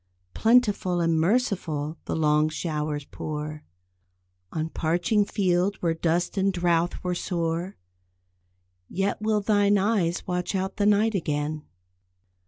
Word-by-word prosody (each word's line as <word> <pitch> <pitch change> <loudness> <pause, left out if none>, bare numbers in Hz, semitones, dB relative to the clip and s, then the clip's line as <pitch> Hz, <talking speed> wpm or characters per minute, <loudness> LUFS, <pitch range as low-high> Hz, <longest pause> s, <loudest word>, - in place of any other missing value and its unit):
Plentiful 215 -6 +3
and 165 -1 +2
merciful 170 - 0
the - - -2
long 150 -1 +3
showers 150 -2 -3
pour 150 +1 -6 0.9
On 160 0 -2
parching 175 +6 +1
field 190 0 +1
where 170 -3 0
dust 170 +3 -1
and 195 +1 +2
drouth 175 -1 0
were 180 0 -1
sore, 170 +1 -2 1.1
Yet, 195 +2 -1
will 215 -1 +1
thine 205 0 +3
eyes 195 -4 0
watch 180 +1 -2
out 190 +1 -2
the 205 0 +2
night 210 +2 +3
again? 150 -4 -2
175 Hz, 120 wpm, -26 LUFS, 160-200 Hz, 1.1 s, Plentiful